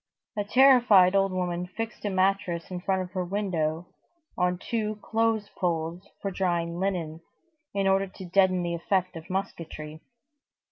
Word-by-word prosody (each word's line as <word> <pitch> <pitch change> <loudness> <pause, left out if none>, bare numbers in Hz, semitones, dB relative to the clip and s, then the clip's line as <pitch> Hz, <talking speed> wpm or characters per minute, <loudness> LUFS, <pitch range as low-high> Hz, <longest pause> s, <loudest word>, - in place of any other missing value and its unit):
A 205 - 0
terrified 230 -6 +6
old 195 0 +3
woman 180 -1 -2
fixed 225 +4 -6
a - - +1
mattress 185 -3 0
in 180 -1 -4
front 190 0 0
of 180 - -10
her 185 -1 -2
window 175 -4 -2 0.5
on 180 0 +1
two 215 +2 -2
clothes 225 -2 0
poles 170 0 -2
for 195 - -1
drying 175 -2 -1
linen, 175 -5 -2 0.6
in 195 -1 +1
order 195 0 +3
to 185 0 -10
deaden 185 0 +3
the 170 0 -2
effect 185 +2 0
of 165 +1 -9
musketry. 165 -5 -5
185 Hz, 150 wpm, -27 LUFS, 175-195 Hz, 0.6 s, terrified